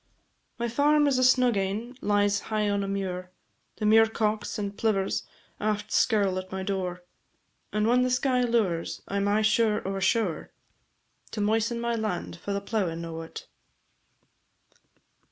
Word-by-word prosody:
My 235 0 -1
farm 295 +5 +3
is 275 -3 +2
a - - +3
snug 255 -3 +4
ane, 205 +6 -2
lies 205 0 +2
high 215 -1 +1
on 200 0 0
a - - -3
muir, 185 -2 -3 0.5
The 215 - -3
muircocks 220 0 +2
and 200 -1 -4
plivers 200 -4 0 0.3
aft 210 0 -2
skirl 200 -5 +2
at 185 0 -9
my 190 0 -3
door, 185 -2 -3 0.7
And 210 0 +1
whan 245 +2 +4
the 255 - +2
sky 250 0 +2
low'rs 220 -9 0
I 200 - -2
'm 200 0 +1
aye 210 +2 +2
sure 215 -1 +2
o' 195 - -2
a - - -4
show'r, 195 -5 0 0.8
To 215 - -2
moisten 225 +3 +1
my 235 0 -1
land 215 -7 -3
for 200 - -6
the 200 0 -1
plowin' 185 -6 -2
o't. 165 0 -7
210 Hz, 155 wpm, -27 LUFS, 195-230 Hz, 0.8 s, snug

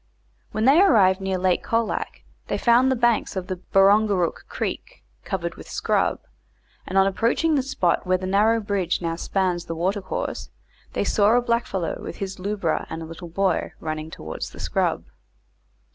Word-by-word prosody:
When 215 +1 -1
they 285 +7 +6
arrived 195 - +5
near 190 -1 -1
Lake 185 -1 +1
Colac 230 -1 -2 0.2
they - - -1
found 245 +2 +4
the 260 - +2
banks 240 -3 +1
of 190 -2 -3
the 185 0 -4
Barongarook 195 -1 +2
Creek - - -5 0.2
covered - - -3
with - - -12
scrub, - - 0 0.7
and 190 - -2
on 195 - +6
approaching 230 +11 +1
the 285 - +3
spot 205 -10 0
where 185 0 +2
the 205 +5 +2
bridge 200 -4 0
now 165 -1 -2
spans 180 -1 -1
the 165 - -5
watercourse, 185 +3 -3 0.4
they - - 0
saw 215 +3 +3
a - - +5
blackfellow 235 -7 -1
with - - -7
his 195 -1 -5
lubra 195 -4 -1
and 160 0 -5
a - - -6
little 165 +2 -9
boy, 185 0 0
running 155 0 -4
towards 80 - -6
the - - -13
scrub. - - 0
195 Hz, 165 wpm, -23 LUFS, 180-220 Hz, 0.7 s, they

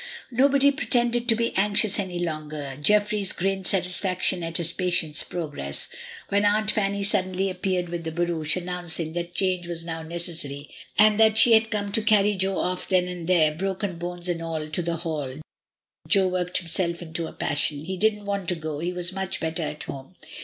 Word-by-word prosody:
Nobody 280 +3 +4
pretended 240 -4 0
to 225 - +5
be 230 +1 -1
anxious 205 +1 +2
any 185 -3 -3
longer. 155 -5 -4
Jeffries 210 +2 +2
grinned 190 +1 -1
satisfaction 180 -1 0
at 165 0 -3
his 170 -1 -1
patient's 175 -5 0
progress. 145 - -4 0.4
When 200 +1 +2
Aunt 210 +1 +3
Fanny 200 -1 -1
suddenly 190 -1 0
appeared 185 -1 -1
with 170 -1 -4
the 160 - -4
barouche, 165 -2 0
announcing 175 -3 +1
that 175 0 -4
change 185 -2 0
was 165 -1 -1
now 165 -1 -4
neces 170 +1 -3
sary, 140 +1 -8 0.3
and 215 0 +5
that 220 -1 +5
she 230 +1 +8
had 220 0 +4
come 205 -2 -2
to 220 - +3
carry 210 -1 +4
Jo 190 0 0
off 180 0 -2
then 180 -2 +3
and 180 -1 -6
there, 160 -4 +4
broken 190 +1 -3
bones 175 0 -4
and 170 -2 -2
all, 160 -2 -4
to 155 +3 +1
the 170 0 -2
Hall, 155 -6 -4 0.7
Jo 195 -2 +4
worked 180 -1 -1
himself 170 0 -2
into 160 0 -4
a - - -8
passion. 145 0 -1
He 190 +2 -3
didn't 210 +2 0
want 200 -3 -2
to 180 - +1
go, 155 -2 -5
he 175 +3 -2
was 180 0 -1
much 190 0 -3
better 160 +1 -2
at 150 0 -4
home. 135 +6 -9
180 Hz, 190 wpm, -25 LUFS, 165-200 Hz, 0.7 s, she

